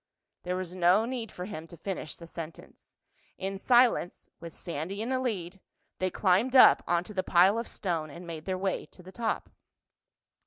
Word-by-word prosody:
There 180 0 -2
was 185 -1 -4
no 185 +4 +4
need 240 -3 -4
for 180 - -6
him 165 -5 -7
to 170 - -12
finish 185 -6 -5
the 170 - -11
sentence. 165 -1 -10 0.4
In 195 0 -4
silence, 240 -6 +3
with 170 -1 -8
Sandy 170 +4 -5
in 225 +3 -3
the 260 -1 +1
lead, 195 -7 -3 0.4
they 185 - +1
climbed 200 +8 +2
up 255 - +8
onto 175 +4 0
the 190 - 0
pile 185 +4 +4
of 230 - -4
stone 165 -6 -2
and 170 +4 -10
made 160 -2 -7
their 185 -1 -1
way 190 0 -2
to 180 - -16
the 185 - -11
top. 230 +1 -3
185 Hz, 185 wpm, -29 LUFS, 170-210 Hz, 0.4 s, up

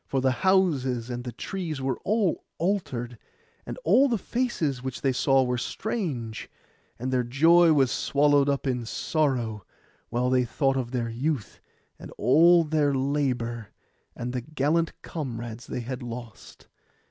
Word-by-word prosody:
For 135 - 0
the 130 0 +2
houses 135 -11 +2
and 120 0 -4
the 125 - -5
trees 165 - -5
were 130 -1 -2
all 210 -4 0
altered; 125 - -2 0.5
and - - -5
all 275 - +5
the 235 - +1
faces 185 - -2
which 130 -1 -5
they 135 - +2
saw 135 +1 +3
were 125 -1 -1
strange; 135 - -4 0.5
and 130 +2 -3
their 125 - +3
joy 165 +7 +5
was 135 -5 +3
swallowed 145 0 +3
up 140 0 -1
in 125 -3 -1
sorrow, 120 - -1 0.5
while 125 +2 0
they 130 -1 +3
thought 135 +3 0
of 130 -3 -2
their 120 -2 -2
youth, 130 0 -3 0.4
and - - -9
all 165 +8 +5
their 150 -2 +1
labour, 130 -5 -1 0.5
and 125 +1 -4
the 125 - -2
gallant 155 +4 -1
comrades 120 -6 -6
they - - -4
had 125 +1 -5
lost. 120 -2 -9
135 Hz, 150 wpm, -26 LUFS, 120-155 Hz, 0.5 s, all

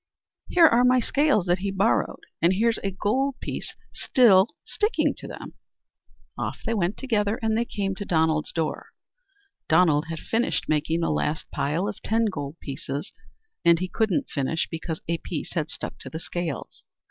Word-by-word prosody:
"Here 345 -2 +6
are 245 -5 +5
my 250 0 +5
scales 280 - +2
that 175 0 +2
he 200 +1 -2
borrowed, 195 +3 +1 0.2
and 170 +3 +4
here's 225 +3 +2
a 195 - -2
gold 250 +8 0
piece - - -5 0.2
still 210 -6 +5 0.2
sticking 425 +2 +1
to - - -8
them." - - -8 0.8
Off - - -4
they 230 - 0
went 195 -2 0
together, 220 -4 0
and 220 0 +2
they 235 +1 +1
came 195 -4 -2
to - - -4
Donald's 160 -3 +1
door. 160 -2 -2 0.8
Donald 160 -2 +4
had 165 0 -4
finished 230 +8 -1
making 155 +2 +1
the 165 - +1
last 155 +2 -1
pile 160 +8 -1
of 210 - -5
ten 225 +1 +1
gold 150 -7 -4
pieces. 140 +3 -5 0.5
And 170 0 +6
he 185 +2 -2
couldn't 220 +7 0
finish 145 +3 -1
because 160 -1 -4
a 170 0 -1
piece 165 -2 -5
had 160 -3 -1
stuck - - -5
to - - -8
the 160 - -6
scales. 170 -4 -5
185 Hz, 170 wpm, -25 LUFS, 160-225 Hz, 0.8 s, Here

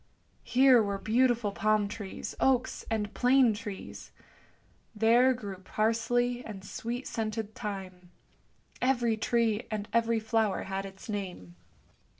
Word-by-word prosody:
Here 255 -1 +5
were 200 -2 -1
beautiful 230 0 +2
palm 215 0 +1
trees, 205 -2 -6
oaks, 255 -1 +1
and 210 -2 -2
plane 250 0 +4
trees; 205 -2 -8 0.8
there 235 +4 +5
grew 205 -6 -5
parsley 230 +5 0
and 195 -3 -9
sweet 240 +5 -5
scented 220 -1 -3
thyme; 185 -4 -7 0.7
every 240 -3 +2
tree 225 0 0
and 210 -1 -3
every 230 0 +2
flower 220 -2 0
had 195 0 -4
its 195 0 -12
name. 185 - -5
220 Hz, 120 wpm, -29 LUFS, 205-240 Hz, 0.8 s, Here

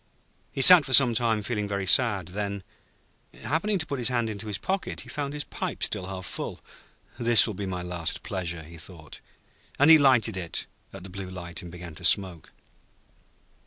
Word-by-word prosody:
He 135 - -3
sat 180 -1 +9
for 135 - -3
some 125 -3 +7
time 115 -2 0
feeling 105 -2 -3
very 100 -1 -3
sad, 100 -4 +2
then 100 0 -5 0.8
happening 195 +8 -1
to 160 - -3
put 140 -3 -5
his 120 - -1
hand 120 -3 -1
into 105 +1 -7
his 105 -2 -3
pocket, 190 0 -3
he - - -13
found 145 -1 -4
his 150 0 -4
pipe - - -6
still 95 - -2
half 95 -1 -7
full. - - -6 0.6
'This 120 -1 +7
will 110 - -4
be 100 0 -5
my 90 -1 -4
last 90 -2 -2
pleasure,' 85 -4 -5
he 85 +2 -13
thought, 80 -3 -7 0.6
as 145 - +4
he 160 -1 +8
lighted 125 -7 +3
it 85 -3 -4 0.3
at 95 -2 -11
the 95 - -10
Blue 95 0 -7
Light, 85 -2 -7
and 85 - -10
began 85 -1 -10
to 75 - -8
smoke. 95 -5 +1
100 Hz, 195 wpm, -26 LUFS, 90-125 Hz, 0.8 s, sat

